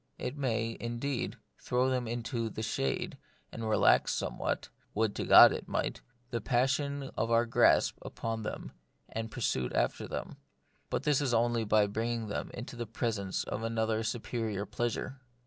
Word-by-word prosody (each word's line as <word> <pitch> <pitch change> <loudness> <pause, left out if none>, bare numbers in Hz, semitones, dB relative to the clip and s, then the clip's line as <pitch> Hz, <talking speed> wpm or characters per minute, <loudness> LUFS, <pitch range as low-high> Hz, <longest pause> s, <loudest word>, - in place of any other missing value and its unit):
It 125 - -4
may, 115 -5 -1
indeed, 120 +3 -3 0.2
throw 125 +1 +1
them 125 -2 0
into 115 0 -2
the 110 - -5
shade, 70 -10 -2 0.3
and 115 -1 -4
relax 110 - +4
somewhat - - -2 0.3
(would 110 -1 +1
to - - -2
God - - +10
it - - -4
might - - -2
!) 120 0 -38
the 115 -2 -1
passion 135 +2 0
of 115 - 0
our 115 0 +4
grasp 115 - +4
upon 115 -1 -4
them 105 - -5 0.4
and 115 0 -4
pursuit 65 - -1
after - - 0
them; - - -5 0.5
but - - -1
this 150 -2 +3
is 130 -4 +1
only 115 0 +2
by 105 0 +4
bringing 115 +2 -2
them - - -3
into 125 +1 -7
the 120 -1 -4
presence 105 -4 -2
of - - -4
another 115 -1 0
and 110 0 -1
superior 110 -3 -2
pleasure. 120 +5 -3
115 Hz, 165 wpm, -31 LUFS, 110-120 Hz, 0.5 s, God